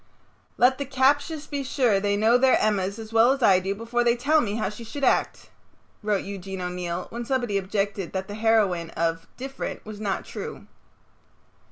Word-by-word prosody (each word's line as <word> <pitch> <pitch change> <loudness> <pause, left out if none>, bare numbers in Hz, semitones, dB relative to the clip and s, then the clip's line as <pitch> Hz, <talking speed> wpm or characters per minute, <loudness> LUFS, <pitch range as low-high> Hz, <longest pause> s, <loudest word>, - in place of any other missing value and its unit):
"Let 260 +2 +4
the 280 - -2
captious 285 +4 +1
be 285 -2 -4
sure 250 -6 +2
they 205 0 0
know 220 +3 +4
their 260 +1 +5
Emmas 200 -1 0
as 225 0 -9
well 230 +3 +6
as 275 -2 -4
I 190 -4 +6
do 195 +2 -3
before 230 +3 -1
they 235 0 +3
tell 300 +6 +3
me 210 -5 -2
how 220 - -1
she 210 +3 -9
would 280 - -4
act," - - +1 0.5
wrote 210 -2 0
Eugene 195 -1 -6
O'Neill 180 0 -3
when 235 +1 -4
somebody 245 -4 -1
objected 195 -1 -2
that 190 0 -3
the 205 - -7
heroine 210 -6 +2
of 165 0 -1
"Diff'rent" 270 +1 -6
was 215 -1 -8
not 200 -3 -2
true. - - -7
215 Hz, 185 wpm, -25 LUFS, 195-250 Hz, 0.5 s, well